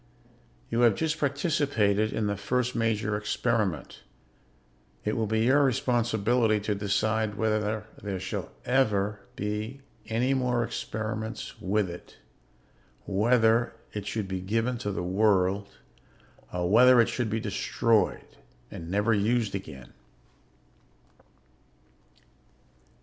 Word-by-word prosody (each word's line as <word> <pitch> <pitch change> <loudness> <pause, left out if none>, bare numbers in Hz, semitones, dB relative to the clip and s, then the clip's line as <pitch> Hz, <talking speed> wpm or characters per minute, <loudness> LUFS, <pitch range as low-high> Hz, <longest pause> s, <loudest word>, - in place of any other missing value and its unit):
"You 115 - 0
have 120 -4 +5
just 160 +4 -1
participated 140 - +1
in 110 - -1
the 100 0 0
first 125 +5 -1
major 110 -2 0
experiment. 105 -4 -1 1.0
It 105 - 0
will 110 -1 0
be 110 +1 +1
your 140 +4 +5
responsibility 120 -3 +2
to 105 +1 -1
decide 105 +2 0
whether 110 0 0 0.2
there 100 -2 -4
shall - - -4 0.2
ever 105 -6 +1 0.2
be 105 +6 -4 0.3
any 120 +4 +1
more 125 -2 +1
experiments 110 0 -5
with 100 +1 +1
it, 85 0 -10 0.9
whether 115 +3 +2 0.2
it 105 -1 -5
should 105 -1 -2
be 95 -1 -3
given 115 +5 -1
to 105 -3 -3
the 90 - -3
world, 100 0 +1 0.7
or 90 -1 -1
whether 125 +5 +7
it 115 - +5
should 120 -1 -2
be 110 +1 -1
destroyed 110 +1 +1 0.5
and 80 - -8
never 105 +4 +2
used 110 +1 +1
again." 75 -10 -7
110 Hz, 115 wpm, -28 LUFS, 100-120 Hz, 1.0 s, whether